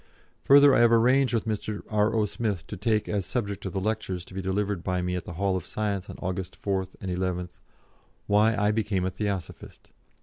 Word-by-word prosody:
Further, 140 0 +7
I - - +4
have 120 -1 +5
arranged 125 +3 +4
with 115 -2 0
Mr. 105 -1 -3
R.O. 105 +1 +2
Smith 105 -3 -3
to - - -7
take 110 +2 0
as 100 -2 -1
subject 100 -1 -3
of - - -6
the 95 - -1
lectures 95 -3 -2
to - - -14
be 95 - -3
delivered 95 -1 -1
by 90 -1 -1
me 90 0 -1
at 90 - -4
the - - -7
Hall 95 +2 0
of 90 - -2
Science 100 -2 -3
on - - -8
August 95 0 -4
4th 95 -2 -2
and 95 -2 -3
11th 90 -1 -3 0.7
'Why 105 +2 +3
I 105 +1 +2
became 105 -4 0
a 95 - -1
Theosophist.' 100 -2 -5
100 Hz, 205 wpm, -27 LUFS, 95-110 Hz, 0.7 s, Further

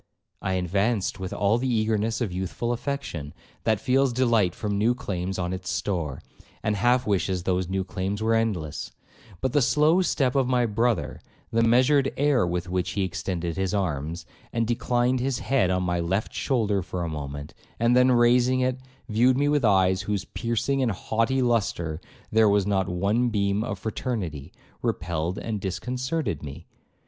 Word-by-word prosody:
I 95 - -1
advanced 100 +3 0
with 95 -1 -5
all 105 +3 +2
the 130 0 -1
eagerness 110 0 0
of 110 -6 -1
youthful 95 +6 -3
affection, 120 - -4 0.3
that 110 -3 +2
feels 135 +3 +2
delight 115 -7 +2
from 105 -2 -2
new 110 +4 +2
claims 95 -5 -3
on 90 0 -2
its 90 -1 -5
store, 85 -8 -2 0.4
and 105 -1 +1
half 120 +5 +2
wishes 95 -3 0
those 90 -1 0
new 95 0 0
claims 95 +2 -3
were 110 +1 +1
endless; 100 -10 -1 0.5
but 130 -2 -1
the 145 - +4
slow 150 +7 +4
step 135 -8 +1
of 135 -2 +2
my 125 -1 +2
brother, 115 -2 0 0.3
the 115 - +2
measured 130 +4 +4
air 140 -8 +3
with 90 +1 -2
which 90 0 -1
he 100 - 0
extended 90 -2 -3
his 95 +1 0
arms, 85 -2 -2 0.3
and 115 0 0
declined 120 +2 +1
his 130 0 0
head 130 -9 +1
on 90 0 +1
my 90 -1 0
left 95 +5 -1
shoulder 105 -7 0
for 90 0 -4
a - - -2
moment, 70 -2 -6 0.3
and 115 +2 +3
then 125 0 +5
raising 125 +1 +4
it, 130 0 0 0.3
viewed 125 +3 +3
me 145 +1 +2
with 145 -2 +2
eyes 95 -3 +3
in 100 - -11
whose 100 -6 -1
piercing 120 - -1
and 120 -5 +1
haughty 115 +7 0
lustre 95 -9 0 0.3
there 110 -1 +5
was 100 -1 +3
not 95 -2 0
one 100 +7 +1
beam 100 -1 0
of 105 -4 -3
fraternity, 95 - -4 0.3
repelled 85 +1 -2
and 110 -3 -4
disconcerted 125 - -2
me. 70 -2 -8
105 Hz, 175 wpm, -25 LUFS, 90-125 Hz, 0.5 s, then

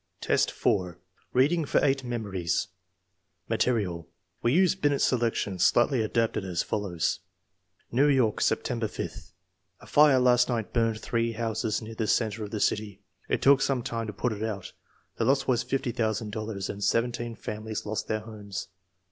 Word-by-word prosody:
X, - - +4
4. 90 -4 0 0.3
Reading 150 +6 +3
for 145 - +2
eight 135 -1 +1
memories 100 -7 -2 0.8
Material. 90 -9 0 0.3
We 120 - +2
use 180 +4 +4
Binet's 145 -7 +1
selection, 115 -6 0
slightly 120 +6 +4
adapted, 110 -1 0
as 90 -3 -1
follows: 95 -6 -1
i 90 +2 -20
New 140 +2 +5
York, 130 -7 +2
September - - 0
5th. - - -7 0.5
A - - -15
fire 145 -2 +5
last 125 -1 +4
night 115 -3 -2
burned 115 -2 +1
three 115 0 -1
houses 110 -1 -2
near 110 +1 -7
the 110 -1 -2
center 110 -1 +1
of 105 - -5
tJie 105 0 -4
city. 105 -2 -1 0.3
It - - 0
took 140 0 +6
some 135 -4 +1
time 115 -1 -3
to - - -3
put 115 +4 -1
it 105 - -7
out. 110 -4 -4 0.4
The 115 - 0
loss 135 +2 +2
was 125 -2 +2
fifty 135 -2 -1
thousand 110 -2 -1
dollars, 105 -3 -4
and 100 0 -5
seventeen 120 +1 0
families 110 0 -5
lost 110 +1 -3
their 110 -1 -1
homes. 105 -2 -7
110 Hz, 165 wpm, -27 LUFS, 105-125 Hz, 0.8 s, took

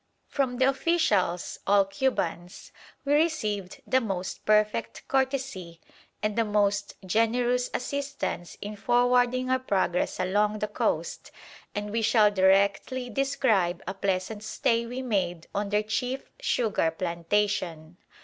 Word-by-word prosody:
From 260 -3 -1
the 260 - +4
officials 265 - +1
all 200 0 +5
Cubans 195 -5 -2 0.3
we 285 - +2
received 215 - 0
the 260 - +2
most 190 -4 -4
perfect 215 +1 +1
courtesy 265 -11 -1 0.4
and 215 -1 0
the 230 - +3
most 205 -1 0
generous 240 +5 +1
assistance 275 -9 -4
in 210 +1 -5
forwarding 245 +3 +2
our 260 - +3
progress 190 -7 0
along 205 +3 +1
the 210 - -2
coast, 210 - -2 0.5
and 205 0 -3
we 230 +1 0
shall 215 -1 +4
directly 200 +6 +2
describe 220 -9 +1
a 190 - -3
pleasant 195 +2 -2
stay 230 +2 0
we 250 +2 -5
made 180 -8 -1
on 205 0 -1
their 210 +1 +1
chief 250 +5 -3
sugar 215 -8 +1
plantation. 170 0 -2
210 Hz, 125 wpm, -27 LUFS, 190-250 Hz, 0.5 s, all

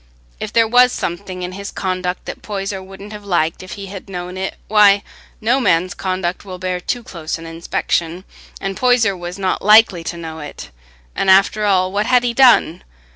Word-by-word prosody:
If - - -5
there 230 -1 +3
was 250 +2 +5
something 180 -1 -4
in 180 - -4
his 200 +2 -7
conduct 185 -1 -3
that - - -7
Poyser 195 -2 -4
wouldn't 195 +2 -11
have 210 -1 -9
liked 170 -5 0
if 185 - -8
he 200 - -7
had 195 0 -9
known 180 -1 -6
it, 190 +1 -4
why, 205 -1 +5 0.4
no 240 +5 +2
man's 180 -7 +2
conduct 185 -1 -3
will 185 -2 -8
bear 185 0 -3
too 240 +6 -3
close 170 -10 -5
an 165 - -10
inspection; 165 +1 -2 0.4
and 195 0 -3
Poyser 245 -5 +3
was 175 +1 -7
not 190 -2 -1
likely 210 -4 +5
to 170 - -4
know 160 -1 -7
it; 145 - -9 0.4
and, 195 - 0
after 195 +2 +4
all, 185 -2 +2
what 205 +2 -1
had 250 -1 +4
he 240 -1 0
done? 240 -9 +4
190 Hz, 190 wpm, -18 LUFS, 180-210 Hz, 0.4 s, was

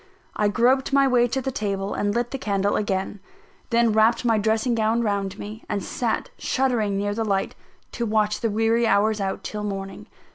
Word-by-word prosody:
I 210 - +2
groped 250 +6 +2
my 275 0 +4
way 245 -2 +3
to 265 +2 -2
the 265 - -2
table 200 -3 -2
and 205 0 -1
lit 240 0 -1
the 270 - -4
candle 200 -4 0
again; 200 0 -2 0.5
then 235 -2 +3
wrapped 225 +3 +3
my 225 -2 +3
dressing 220 +3 +1
gown 225 +1 +1
round 200 -3 -1
me, 215 +2 -8
and 200 -2 -2
sat 230 +3 -2
shuddering 235 -7 0
near 205 +1 -1
the 225 +2 -1
light, 195 -3 -1 0.4
to 235 -1 -3
watch 215 -1 +1
the 230 - +1
weary 225 +2 +2
hours 215 0 +2
out 195 -1 -3
till 210 -1 -5
morning. 195 -1 -5
220 Hz, 190 wpm, -24 LUFS, 205-235 Hz, 0.5 s, my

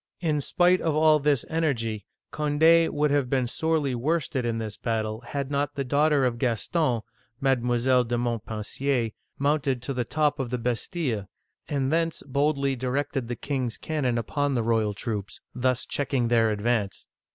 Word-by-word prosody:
" - - -58
In 150 -1 +1
spite 180 +5 +3
of 160 -2 0
all 155 0 +5
this 145 -3 +1
energy, 115 -10 -1 0.3
Cond6 160 +3 +4
would 150 0 +1
have 140 -3 +1
been 130 -2 +1
sorely 155 +1 0
worsted 135 0 -1
in 115 -1 -1
this 110 -2 -4
battle 110 -1 -2
had 140 -1 -3
not 145 0 -1
the 140 - -1
daughter 145 +1 +3
of 120 -2 -1
Gaston 125 - 0 0.4
(Mile, 125 -1 +2
de 120 0 -2
Montpensier) 115 +1 -1 0.3
mounted 140 -2 +1
to 135 - -3
the 125 -1 -1
top 150 +4 0
of 130 -3 -2
the 125 - -1
Bastille, 120 - -2 0.4
and 135 -1 -1
thence 165 0 0
boldly 140 0 +1
di 130 +1 -4
rected 135 -1 -1
the 120 - -3
king's 130 -1 -3
cannon 135 -7 -1
upon 140 +4 -1
the 120 - +1
royal 110 -2 +1
troops, 100 -2 -4
thus 130 0 0
checking 135 -4 -1
their 115 -2 +3
ad 105 -1 -3
vance. 110 -4 -1
130 Hz, 170 wpm, -26 LUFS, 115-145 Hz, 0.4 s, all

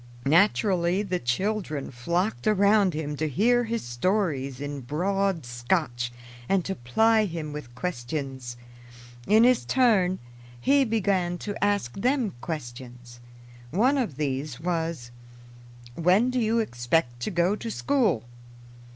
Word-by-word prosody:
Naturally 180 +3 +3
the 185 -3 -2
children 155 - -2
flocked 170 - -2
around 200 -3 +4
him 150 -1 -3
to 155 +1 -1
hear 240 - +2
his 230 0 -3
stories 140 - -1
in 145 -1 -5
broad 180 +4 -1
Scotch 120 0 -1 0.4
and 195 -3 +2
to 195 - -2
ply 215 - +2
him 160 -5 -5
with 135 -5 -8
questions. 130 -4 -4 0.7
In 220 +2 +6
his 250 0 +4
turn, 210 -8 +3 0.4
he 275 - +3
began 195 -6 0
to 205 -1 -3
ask 205 -12 +1
them 245 - 0
questions. 120 -5 -7 0.5
One 250 - +2
of 215 - -2
these 140 -2 -3
was, 165 -7 -3 0.8
"When 185 - +3
do 255 - 0
you 225 0 +1
expect 120 - 0
to 125 - -2
go 180 +1 +1
to 230 - -6
school?" 225 - +1
175 Hz, 125 wpm, -26 LUFS, 135-210 Hz, 0.8 s, In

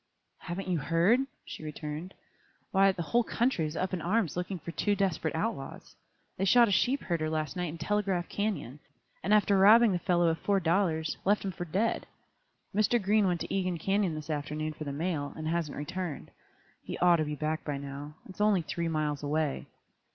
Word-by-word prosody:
"Haven't 185 +2 -5
you 180 -3 +1
heard?" 170 - +3 0.3
she - - -8
returned. 155 +4 -6 0.6
"Why, 195 0 +5
the 175 -2 -4
whole 235 +8 +2
country 230 -10 0
is 150 - -6
up 185 0 -2
in 180 - -1
arms 190 -1 0
looking 180 +2 -3
for 170 - -7
two 205 +4 0
desperate 185 -5 0
outlaws. 160 -6 -4 0.4
They 195 - 0
shot 240 +4 +6
a - - -1
sheep 255 +7 +2
herder 165 -3 -1
last 155 +2 -2
night 180 -2 -2
in 160 - -7
Telegraph 190 0 0
Canyon, 200 - -3 0.4
and 195 - -2
after 205 -2 +4
robbing 220 +3 +7
the 180 - 0
fellow 175 -1 +2
of 165 - -1
four 200 -1 +2
dollars, 165 -2 +1
left 205 +1 +2
him 195 - -1
for 175 0 -6
dead. 200 +8 -1 0.7
Mr. 215 +4 +3
Green 205 0 +3
went 175 -2 0
to - - -4
Egan 185 -2 0
Canyon 195 0 0
this 155 +1 -5
afternoon 155 +1 -3
for 155 - -7
the 140 - -3
mail, 145 -1 -2
and 155 0 -5
hasn't 165 -3 -1
returned. 160 +1 -5 0.5
He - - -6
ought 175 -1 +5
to 155 - +1
be 150 0 -3
back 155 +2 -2
by 145 -2 -3
now. 140 +2 -7
It - - -9
is 205 - -7
only 205 -4 +3
three 170 +1 -3
miles 155 -2 -1
away." 150 0 -1
175 Hz, 200 wpm, -30 LUFS, 155-195 Hz, 0.7 s, robbing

